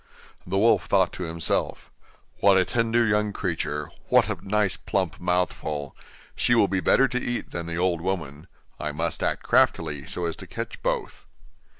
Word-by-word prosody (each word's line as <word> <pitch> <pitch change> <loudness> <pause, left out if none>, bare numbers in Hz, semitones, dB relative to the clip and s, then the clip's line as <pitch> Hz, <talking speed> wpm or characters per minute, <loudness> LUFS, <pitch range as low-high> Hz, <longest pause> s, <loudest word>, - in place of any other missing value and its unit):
The 95 +2 -1
wolf 115 +4 +3
thought 95 -2 +3
to 90 - -4
himself: 80 0 -2 0.5
'What 100 -1 +5
a 95 - +4
tender 115 0 +1
young 105 -1 +1
creature! 75 -6 -3 0.2
what - - +5
a - - -2
nice 105 -2 +2
plump 95 -4 -2
mouthful 85 -5 -1 0.4
she 120 - +2
will 110 -4 +5
be 95 -1 0
better 135 +8 +4
to 125 0 -2
eat 120 0 -3
than 85 -1 -4
the 85 0 -3
old 90 -2 +1
woman. 80 -4 -4 0.3
I 75 -1 -3
must 80 +2 -2
act - - -1
craftily, 70 -2 +2
so 90 - -2
as 85 - -2
to - - -10
catch - - -6
both. - - -3
90 Hz, 175 wpm, -25 LUFS, 80-105 Hz, 0.5 s, What